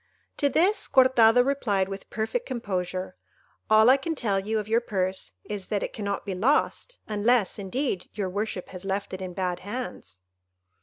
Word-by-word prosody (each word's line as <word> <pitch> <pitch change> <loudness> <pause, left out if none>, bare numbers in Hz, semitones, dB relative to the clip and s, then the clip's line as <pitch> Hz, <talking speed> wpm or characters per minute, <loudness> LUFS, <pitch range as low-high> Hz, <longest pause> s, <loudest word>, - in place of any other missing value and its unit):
To 285 - +2
this 365 +10 +2
Cortado 245 -2 +5
replied 215 -9 +1
with 195 0 -8
perfect 225 - -2
composure, 185 -6 -3 0.5
"All 215 +1 +6
I 260 +2 +7
can 325 +4 -3
tell 205 -8 0
you 215 +3 -1
of 210 -1 -3
your 225 +2 +2
purse 190 - -2
is, 205 -3 -6
that 205 -2 -1
it - - -4
cannot 200 -2 -3
be 195 - -3
lost, 280 - +1
unless, 215 0 +2
indeed, 200 0 -2
your 200 -3 -1
worship 200 0 -3
has 185 -1 -7
left 195 +1 -3
it 185 - -5
in 180 -1 -6
bad 180 -2 -1
hands." 190 - -7
205 Hz, 170 wpm, -26 LUFS, 190-245 Hz, 0.5 s, I